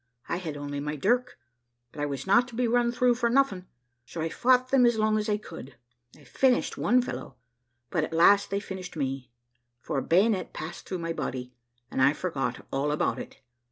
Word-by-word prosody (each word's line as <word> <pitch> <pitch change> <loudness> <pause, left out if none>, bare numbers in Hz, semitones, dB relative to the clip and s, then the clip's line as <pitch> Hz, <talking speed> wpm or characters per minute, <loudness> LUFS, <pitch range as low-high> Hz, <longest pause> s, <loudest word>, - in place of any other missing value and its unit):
I - - -1
had 160 -5 -5
only 145 0 -4
my 150 +1 -3
dirk, 245 - 0 0.5
but 145 - -7
I 145 - 0
was 140 -2 -4
not 200 +6 +4
to 240 - -11
be 245 0 +1
run 240 0 +2
through 245 0 +3
for 235 0 0
nothing, 230 -8 +1 0.4
so 135 +7 -9
I 160 +1 -1
fought 255 +6 +3
them 270 -1 +4
as 240 -2 +4
long 215 0 +2
as 210 - -2
I 210 - +2
could, 160 -10 -10 0.4
I 150 - -18
finished 250 - +1
one 250 +1 +3
fellow, 135 - -6 0.6
but 160 - +1
at - - -4
last 200 +5 +5
they 200 - -1
finished 190 -3 -7
me; 135 -2 -3 0.5
for 135 - -2
a - - -2
bayonet 190 +3 +2
passed 165 +3 -7
through 185 - -2
my 165 -1 -3
body, 125 -5 -4 0.4
and - - -1
I 140 +2 +5
forgot 160 -4 -3
all 140 +2 0
about 150 - 0
it. - - -10
185 Hz, 205 wpm, -27 LUFS, 145-235 Hz, 0.6 s, last